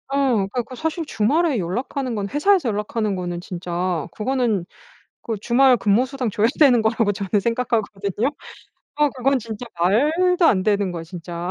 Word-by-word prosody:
어 275 -3 +2
그래 195 -3 0
갖고 250 0 -3
사실 320 +5 -3
주말에 285 +7 +1
연락하는 245 +8 -3
건 205 -2 -2
회사에서 300 - +2
연락하는 210 0 -2
거는 175 -1 -4
진짜 175 -2 -3
그거는 225 -5 0 0.6
그 230 - -3
주말 255 +2 +4
근무 215 +3 +2
수당 260 -3 -3
줘야 210 +2 +2
되는 265 -6 +6
거라고 220 -1 +1
저는 200 +1 -1
생각하거든요. 220 -2 -1 0.7
어 300 0 +3
그건 265 +1 +1
진짜 230 0 -7
말도 320 - +3
안 185 -9 +3
되는 205 -3 +1
거예요, 170 -2 -6
진짜. 170 +1 -6
225 Hz, 350 characters per minute, -21 LUFS, 195-265 Hz, 0.7 s, 되는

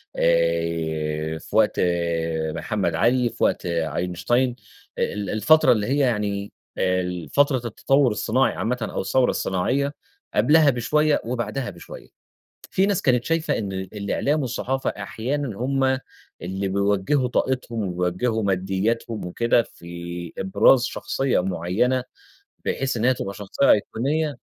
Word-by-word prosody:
آآ 80 -2 0
في - - -9
وقت - - +3 0.8
محمد 95 -2 -1
علي، 120 +7 +2
في 115 - -5
وقت - - +1
أينشتاين، 90 - 0 0.4
ال 100 0 -2
الفترة 150 +6 +5
اللي 105 -4 +1
هي 135 - +1
يعني 105 -6 0 0.3
ال 90 -3 -1
فترة 140 -1 +3
التطوّر 130 +3 +2
الصناعي 115 +5 +1
عامةً 125 +3 -1
أو 110 - -2
الثورة 125 +6 +2
الصناعية، 135 +10 0 0.4
قبلها 150 +7 +5
بشوية 150 +4 +2
وبعدها 120 +1 -3
بشوية، 85 -3 -11 0.6
في 190 +1 +2
ناس 200 -3 0
كانت 125 -3 +2
شايفة 165 0 0
إن 100 -3 -3
ال 95 +1 -6
الإعلام 135 +9 0
والصحافة 130 +1 -2
أحيانًا 120 +3 -4
هُم 130 +1 +1 0.4
اللي 95 +2 -3
بيوجّهوا 100 +7 +1
طاقتهم 125 -2 -1 0.2
ويوجّهوا 110 +6 0
مادياتهم 100 +3 -1
وكده، 115 +6 +2
في 85 -3 -8
إبراز 100 +6 +4
شخصية 135 -6 -1
معيّنة، 95 +8 0 0.6
بحيث 135 -2 -1
إن 115 - -1
هي 130 +1 +4
تبقى 100 -4 -5
شخصية 105 +7 +1
أيقونية 145 +8 +1
110 Hz, 125 wpm, -23 LUFS, 95-130 Hz, 0.8 s, الفترة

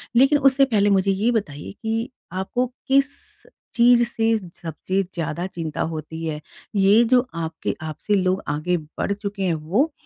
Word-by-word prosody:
लेकिन 270 +4 +6
उससे 275 0 +5
पहले 210 -5 +2
मुझे 195 0 +3
ये 205 +5 +1
बताइए 155 -11 -3
कि 225 +2 -2 0.2
आपको 190 +7 -1 0.2
किस 275 0 +4 0.6
चीज़ 240 0 +5
से 225 -1 +1 0.2
सबसे 175 +4 -2
ज़्यादा 170 +1 -3
चिंता 165 -4 -5
होती 160 +1 -6
है? 155 -1 -3 0.3
ये 200 +3 +5
जो 250 0 +5
आपके 160 -1 -3
आपसी 160 +6 -3
लोग 185 +1 +1
आगे 155 +5 0
बढ़ 155 +4 -5
चुके 200 -1 -5
हैं 180 -3 +1
वो 185 - 0
195 Hz, 155 wpm, -23 LUFS, 165-235 Hz, 0.6 s, लेकिन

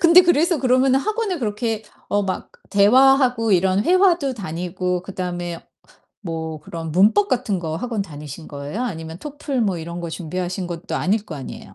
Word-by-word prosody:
근데 345 +1 +8
그래서 340 -1 +3
그러면은 260 +1 +3
학원을 430 -1 -1
그렇게 220 -1 -2 0.3
어 205 0 +1
막 190 -2 -4 0.2
대화하고 245 +1 +5
이런 190 +2 +3
회화도 350 -7 +3
다니고 180 -1 -3
그다음에 175 -2 -5 0.6
뭐 160 -4 -5
그런 165 0 -6
문법 215 - +4
같은 235 -7 0
거 160 -2 -3
학원 230 0 -2
다니신 150 -3 -9
거예요? 145 - -5
아니면 165 -8 -5
토플 285 0 -4
뭐 195 -5 0
이런 170 +2 -6
거 170 - -4
준비하신 180 +3 -4
것도 170 0 -5
아닐 205 +3 +1
거 165 - -6
아니에요. 135 - -9
200 Hz, 365 characters per minute, -21 LUFS, 170-255 Hz, 0.6 s, 근데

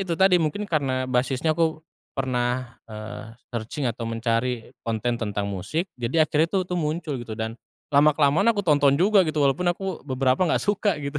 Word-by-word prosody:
itu 170 - 0
tadi, 190 -1 +6
mungkin 165 +7 -1
karena 130 -5 0
basisnya 130 +5 +1
aku 160 -1 +1 0.3
pernah, 125 -2 -1
eee, 110 +1 -8 0.2
searching 120 +5 -3
atau 115 +1 -6
mencari 115 +1 -1
konten 115 +1 -1
tentang 105 -2 -2
musik, 100 - -3
jadi 130 +7 +2
akhirnya 155 +3 +2
tuh - - 0
itu 180 - -3
muncul 155 -1 -2
gitu. 115 -2 -6
Dan 110 0 -3 0.4
lama-kelamaan 150 +5 +4
aku 205 - -1
tonton 145 -3 +4
juga 195 +1 +5
gitu 155 -1 0
walaupun 140 +6 +1
aku 190 -2 -5
beberapa 130 +3 +1
nggak - - +1
suka 205 -3 +1
gitu. 140 +1 -3
140 Hz, 170 wpm, -24 LUFS, 120-160 Hz, 0.4 s, tadi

